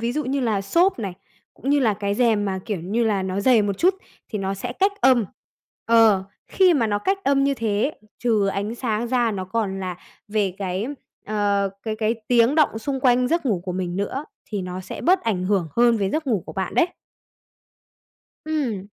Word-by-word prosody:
ví 235 +1 -1
dụ 300 +1 -2
như 270 +2 -1
là 220 -5 0
xốp 340 - +2
này, 195 -5 -3 0.4
cũng 275 - -3
như 290 - +4
là 220 -5 +2
cái 200 0 -2
rèm 220 -3 +2
mà, 190 -1 -2
kiểu 205 -6 -2
như 215 +7 0
là, 205 -3 +1
nó 190 +1 -2
dày 235 -2 +4
một 200 -1 -2
chút 370 +2 +4 0.3
thì 215 - -4
nó 195 0 -2
sẽ 240 +5 -5
cách 390 +8 +2
âm. 250 -4 +5 0.6
Ờ, 225 -4 +5 0.2
khi 370 -3 +4
mà 235 -6 +2
nó 205 -1 0
cách 390 - 0
âm 275 0 +3
như 280 0 +2
thế, 225 +4 -1 0.2
trừ 220 -5 +2
ánh 200 +3 -2
sáng 230 -1 -2
ra, 240 -2 +2
nó 190 -3 -3
còn 195 -1 -2
là 180 -2 -4 0.3
về 205 -3 0
cái, 190 +3 -2 0.4
ờ, 200 -2 +1
cái 220 -1 -3
cái 220 +1 0
tiếng 240 +3 +4
động 295 -8 +3
xung 270 +3 -3
quanh 250 -1 +3
giấc 335 -3 0
ngủ 195 -7 +1
của 180 - -3
mình 180 -1 -3
nữa, 260 +9 -3 0.3
thì 205 -3 -2
nó 180 +1 -5
sẽ - - -8
bớt 365 +3 +3
ảnh 190 -5 -1
hưởng 185 -4 +1
hơn 235 -1 +5
về 195 -2 -1
giấc 310 -1 -2
ngủ 215 -10 0
của - - -7
bạn 190 -1 -3
đấy. 345 - +4 1.6
Ừm. 255 -11 -2
220 Hz, 210 wpm, -23 LUFS, 195-255 Hz, 1.6 s, âm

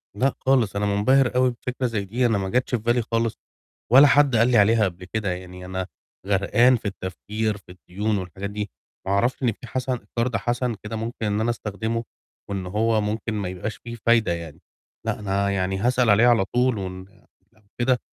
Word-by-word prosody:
لأ 130 +5 +1
خالص، 130 -7 +2
أنا 100 +1 0
مُنبَهر 125 +6 +3
أوي 125 0 +4
بفكرة 125 +2 -4
زي 105 -4 -2
دي، 120 +6 0
أنا 115 -3 +2
ما 95 -1 -2
جاتش 125 +3 +1
في 115 - -3
بالي 120 +2 +2
خالص 115 0 -1 0.5
ولا 135 +4 +9
حد 140 -2 +4
قال 115 +1 +4
لي 120 - +5
عليها 110 +2 +5
قبل 90 -1 -5
كده، 100 0 -2
يعني 90 0 -7
أنا 95 0 -4 0.4
غرقان 100 +6 +4
في 115 - -4
التفكير، 105 +3 -3
في 95 -2 -16
الديون 100 +4 -3
والحاجات 95 +1 -5
دي، 105 0 -4 0.4
ما - - 0
أعرفش 120 +7 +1
إن 120 - +3
في 120 +3 -11
حَسَن 130 +1 -2 0.2
قَرْض 115 0 +1
حَسَن 120 -1 -1
كده 105 +1 -5
ممكن 115 +1 -4
إن 105 0 0
أنا 115 - +1
أستخدمه 115 0 -3 0.5
وإن 100 -2 -3
هو 110 +4 +1
ممكن 110 +2 -2
ما 100 -4 -2
يبقاش 95 +4 -5
فيه 120 0 -8
فايدة 115 -6 +4
يعني. 85 -3 -8 0.4
لأ، - - -1
أنا 100 -1 0
يعني 95 -1 -1
هاسأل 120 +3 +2
عليه 105 +4 +6
على 115 -5 +4
طول، 125 +2 +1
وإن 95 -1 -6 0.5
لو 110 -1 -28 0.2
كده 125 +1 +2
110 Hz, 200 wpm, -24 LUFS, 100-120 Hz, 0.5 s, ولا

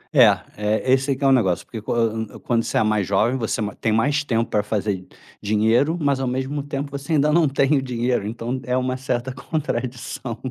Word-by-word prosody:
É, - - +9 0.3
é, 110 +5 +1
esse 135 +1 +2
que 140 +2 -3
é 135 - +5
negócio, 100 -9 +2
porque 110 -3 -7
quan 110 0 -1
quando 115 -1 +1
você - - -2
é - - +4
mais 105 -3 +1
jovem, 110 +6 +2
você 115 -2 -2
ma 105 - -2
tem 110 - -1
mais 145 +7 +2
tempo 115 -4 0
pra 105 - +1
fazer 100 -3 -2 0.3
dinheiro, 110 +10 +2
mas 140 -3 +1
ao 130 - -1
mesmo 130 +3 -2
tempo, 140 0 -5
você 140 +3 -4
ainda 150 0 +3
não 165 -4 +4
tem 140 +2 +2
o 135 - +1
dinheiro, 120 -4 -1
então 120 +3 -4
é 125 0 0
uma 130 0 0
certa 130 -1 -2
contradição. 130 -5 -4
125 Hz, 205 wpm, -22 LUFS, 110-135 Hz, 0.3 s, É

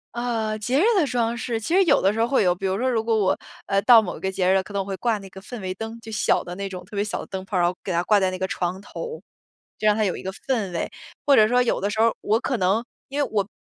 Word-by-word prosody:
呃， 225 -3 -1
节 245 +5 0
日 - - +4 0.2
的 300 - +2
装 235 -1 0
饰， 230 0 -2
其 275 +10 -3
实 385 - +6
有 - - +4
的 195 - +3
时 225 - -4
候 230 - +3
会 260 -5 +2
有， 180 - +3
比 185 +2 -6
如 190 0 0
说 255 +4 0
如 230 -3 +1
果 225 0 +1
我， 195 -3 +1 0.3
呃， 195 0 +2
到 235 -1 +8
某 195 - -5
个 190 - -2
节 185 -1 0
日 190 - +4
了， 190 - +3
可 205 - -12
能 200 - 0
我 - - -5
会 195 -1 -4
挂 230 -3 0
那 195 -1 -11
个 190 - -11
氛 215 +3 -8
围 185 0 -3
灯， 225 +3 -6
就 225 - -9
小 215 - +1
的 175 - -7
那 200 0 -4
种 185 -2 -7
特 200 +3 -10
别 200 - +2
小 210 - -3
的 - - -8
灯 190 0 -6
泡， 195 -2 -2
然 175 - +3
后 180 +1 -1
给 185 - -3
它 170 - +1
挂 205 +2 +4
在 190 -1 +2
那 185 - -4
个 190 - -1
床 180 +2 -2
头， 475 - -7 0.6
就 215 - -3
让 210 - +5
它 220 - +1
有 190 -4 0
一 - - -7
个 190 - -4
氛 220 -8 -2
围。 170 - -3 0.3
或 285 - +5
者 215 0 +7
说 250 +2 +3
有 240 - 0
的 200 - -1
时 215 +2 0
候 230 0 +4
我 215 +2 +2
可 255 - -1
能 195 +5 +1 0.3
因 285 +1 -1
为 - - -3
我 200 -2 0
210 Hz, 350 characters per minute, -24 LUFS, 190-230 Hz, 0.6 s, 到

